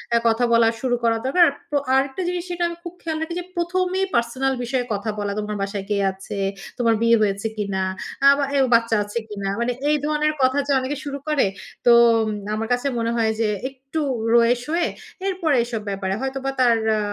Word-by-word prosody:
আ -, -, +6 dB
কথা 225 Hz, +2 st, +2 dB
বলা 230 Hz, -1 st, +5 dB
শুরু 250 Hz, -2 st, +1 dB
করা 230 Hz, -1 st, +3 dB
দরকার। 345 Hz, +7 st, +4 dB
আর -, -, -7 dB, 0.2 s
পো 290 Hz, -, +2 dB, 0.2 s
আরেকটা 270 Hz, +5 st, 0 dB
জিনিস 355 Hz, -1 st, -2 dB
যেটা 350 Hz, 0 st, -2 dB
আমি 340 Hz, -, -7 dB
খুব 345 Hz, -1 st, -7 dB
খেয়াল 320 Hz, -1 st, -3 dB
রাখি 320 Hz, +1 st, -3 dB
যে, -, -, -5 dB
প্রথমেই 365 Hz, +2 st, 0 dB
পার্সোনাল 255 Hz, +3 st, +1 dB
বিষয়ে 245 Hz, 0 st, -1 dB
কথা 205 Hz, +2 st, -3 dB
বলা, 205 Hz, -1 st, -2 dB
"তোমার 210 Hz, 0 st, -3 dB
বাসায় 195 Hz, 0 st, -3 dB
কে 205 Hz, -, +1 dB, 0.2 s
আছে? 195 Hz, +2 st, -7 dB, 0.4 s
তোমার 230 Hz, -2 st, +3 dB
বিয়ে 230 Hz, 0 st, +5 dB
হয়েছে 200 Hz, +1 st, 0 dB
কিনা? 200 Hz, -2 st, -2 dB, 0.4 s
আ -, -, +9 dB
বা 285 Hz, -, 0 dB
এও 270 Hz, -, +4 dB
বাচ্চা 230 Hz, -1 st, +2 dB
আছে 205 Hz, +2 st, -6 dB
কিনা?" 200 Hz, -2 st, -4 dB
মানে 235 Hz, +1 st, 0 dB, 0.2 s
এই 300 Hz, -, +4 dB
ধরনের 305 Hz, 0 st, +1 dB
কথা 260 Hz, +2 st, +3 dB
যে -, -, 0 dB
অনেকে 260 Hz, 0 st, -4 dB, 0.2 s
শুরু 280 Hz, -1 st, -4 dB
করে। 300 Hz, -3 st, +2 dB, 0.4 s
তো 240 Hz, -, +7 dB, 0.3 s
উম 215 Hz, -, -2 dB, 0.3 s
আমার 225 Hz, +1 st, -3 dB
কাছে 245 Hz, +3 st, -1 dB
মনে 230 Hz, 0 st, 0 dB
হয় 220 Hz, -1 st, +2 dB
যে, 225 Hz, -, +2 dB, 0.2 s
একটু 270 Hz, +4 st, -6 dB, 0.3 s
রয়ে 235 Hz, +1 st, +5 dB
শোয়ে, 335 Hz, +3 st, 0 dB, 0.4 s
এরপরে 355 Hz, -6 st, +1 dB
এসব 235 Hz, -2 st, -4 dB
ব্যাপারে। 195 Hz, -1 st, -2 dB
হয়তো 270 Hz, 0 st, -2 dB
বা 270 Hz, -, +1 dB
তার 240 Hz, -2 st, +5 dB, 0.2 s
আ -, -, 0 dB
245 Hz, 210 wpm, -22 LUFS, 225-300 Hz, 0.4 s, আ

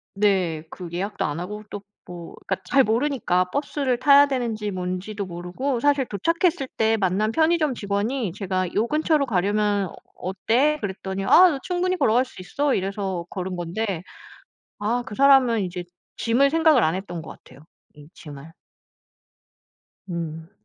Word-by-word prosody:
네. 185 Hz, -6 st, +1 dB
그 180 Hz, -3 st, -8 dB
예약도 200 Hz, +4 st, -3 dB
안 150 Hz, +2 st, -3 dB
하고 210 Hz, +4 st, -6 dB
또 205 Hz, -, -6 dB, 0.2 s
뭐 175 Hz, -1 st, -10 dB
그니까 190 Hz, -, +1 dB
잘 275 Hz, -1 st, +5 dB
모르니까 230 Hz, -6 st, +1 dB
버스를 280 Hz, -3 st, -1 dB
타야 280 Hz, +1 st, +7 dB
되는지 230 Hz, -6 st, -2 dB
뭔지도 185 Hz, +2 st, -4 dB
모르고 180 Hz, +10 st, -3 dB
사실 285 Hz, -2 st, +3 dB
도착했을 330 Hz, -, 0 dB
때 220 Hz, 0 st, +2 dB
만난 205 Hz, +2 st, +1 dB
편의점 315 Hz, -2 st, +2 dB
직원이 205 Hz, +1 st, -2 dB
제가 185 Hz, -3 st, -2 dB
요 220 Hz, +3 st, +1 dB
근처로 305 Hz, -1 st, +1 dB
가려면 205 Hz, 0 st, +1 dB
어 -, -, -13 dB, 0.2 s
어때? 240 Hz, +11 st, +1 dB
그랬더니 190 Hz, -1 st, -4 dB
"아 365 Hz, -, +7 dB
너 275 Hz, -, -3 dB
충분히 365 Hz, +2 st, -1 dB
걸어갈 245 Hz, -3 st, +3 dB
수 250 Hz, -, -12 dB
있어." 280 Hz, +9 st, -1 dB
이래서 190 Hz, -2 st, -2 dB
걸은 185 Hz, -1 st, -4 dB
건데 175 Hz, +1 st, -3 dB, 0.8 s
아 230 Hz, +4 st, 0 dB
그 210 Hz, -, -7 dB
사람은 265 Hz, -4 st, +5 dB
이제 180 Hz, -1 st, -5 dB, 0.3 s
짐을 245 Hz, +5 st, +3 dB
생각을 315 Hz, -5 st, +4 dB
안 160 Hz, +2 st, +2 dB
했던 185 Hz, -3 st, -5 dB
것 155 Hz, -, -11 dB, 0.2 s
같아요. 130 Hz, +2 st, -16 dB, 0.3 s
이 150 Hz, 0 st, -15 dB
짐을. 145 Hz, 0 st, -11 dB, 1.6 s
음. 165 Hz, 0 st, -5 dB
210 Hz, 300 characters per minute, -23 LUFS, 185-270 Hz, 1.6 s, 타야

